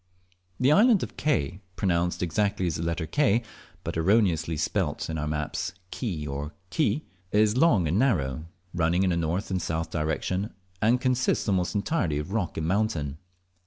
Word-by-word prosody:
The 130 +3 +4
island 215 +3 +5
of - - -6
Ke 90 - 0 0.2
(pronounced 90 -2 0
exactly 100 +2 0
as 85 -4 -1
the - - -4
letter 85 0 -1
K, 120 - +2 0.4
but - - -4
erroneously 85 -3 +2
spelt 80 - -1
in 80 - -3
our 75 - -2
maps 75 +1 -2 0.2
Key 90 - -3
or 70 +2 -4 0.2
Ki) 155 -1 +1 0.3
is 105 +1 +3
long 125 - +4
and 85 +7 +1
narrow, 80 - +1 0.3
running 85 +1 +2
in 95 - +2
a - - +1
north 85 +5 -1
and 90 -1 0
south 80 0 -2
direction, 85 +6 -2 0.3
and 115 +3 +4
consists 125 -1 +1
almost 90 -3 +1
entirely 100 - 0
of 75 +5 -4
rock 105 -6 -1
and 80 - -1
mountain. 85 -8 0
90 Hz, 165 wpm, -27 LUFS, 80-110 Hz, 0.4 s, island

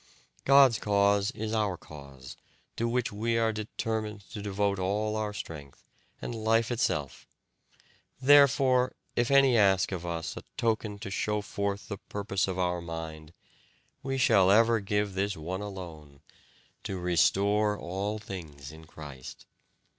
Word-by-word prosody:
God's 135 -4 +6
cause 100 0 +2
is 110 -3 -4
our 105 -5 0
cause, 70 -5 -12 0.4
to 115 - -1
which 120 0 0
we 115 +3 -1
are 115 -1 +2
determined 110 0 -4
to 105 - -6
devote 100 -1 -1
all 105 +3 -1
our 110 -1 -2
strength 75 -8 -9 0.3
and - - -5
life 115 +1 +1
itself 75 - -2 0.9
Therefore, 130 -2 +5 0.2
if 120 0 +1
any 135 -2 +5
ask 100 -4 +3
of 90 -3 -4
us 85 -2 -4
a - - -7 0.2
token 110 -2 -1
to 100 -1 -7
show 105 +2 -1
forth 100 0 -3
the 100 -3 -6
purpose 100 -2 -2
of 95 -1 -3
our 90 -1 0
mind, 80 -2 -7 0.7
we 135 -1 -2
shall 100 -7 +4
ever 115 +3 +5
give 105 0 -1
this 100 +1 -1
one 90 +5 -4
alone 80 -8 -9 0.6
'to 95 - -4
restore 100 +4 +2
all 100 +5 -3
things 80 -9 -8
in 80 +1 -13
Christ'." 70 -5 -10
100 Hz, 140 wpm, -29 LUFS, 90-110 Hz, 0.9 s, God's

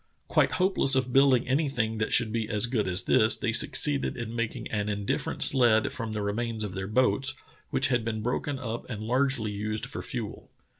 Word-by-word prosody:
Quite - - +2
hopeless 185 -7 +2
of 125 -2 0
building 135 -2 +4
anything 130 -6 0
that 110 - -1
should 120 -3 +2
be 110 -2 -2
as 105 -1 +1
good 120 -4 -1
as 90 +1 0
this, 110 +1 +4
they 115 - -1
succeeded 140 +5 +2
in 115 -1 -5
making 115 -1 -3
an 105 -1 -2
indifferent 100 -1 -2
sled 120 -5 +4
from 115 -3 -4
the 105 -1 -3
remains 110 +2 -2
of 100 -3 -5
their 95 0 -4
boats, 130 +5 +1 0.3
which 135 0 +1
had 120 -3 +1
been 110 -1 -3
broken 130 +4 -2
up 120 -3 -6
and 110 -3 -5
largely 125 -2 +1
used 105 +1 -3
for - - -6
fuel. - - -6
115 Hz, 195 wpm, -27 LUFS, 110-130 Hz, 0.3 s, building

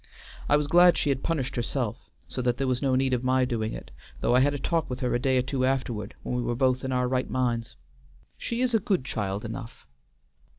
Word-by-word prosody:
I 145 - +6
was 150 - 0
glad 175 +3 +6
she 145 - +1
had 135 -1 0
punished 150 -6 -2
herself, 120 -2 -3 0.2
so 125 - -4
that 125 -1 +1
there 135 - 0
was 125 -1 0
no 135 -2 +2
need 130 0 +2
of 125 0 0
my 130 0 +3
doing 110 -3 -2
it, - - -8 0.3
though - - +1
I 125 - +6
had 145 +2 +3
a - - -2
talk 165 +3 -1
with 125 +1 -5
her 125 - 0
a 120 - +2
day 130 +1 +2
or 125 - +2
two 130 0 -2
afterward, 125 -5 -1
when - - -3
we 125 - 0
were 120 0 -1
both 130 0 +1
in 130 - -2
our 125 -1 +1
right 130 0 -1
minds. 120 - -1 0.6
She 235 +1 -3
is 255 -1 +1
a 225 - +4
good 190 -8 0
child 100 -4 -3
enough." 115 +1 -8
130 Hz, 245 wpm, -27 LUFS, 120-135 Hz, 0.6 s, I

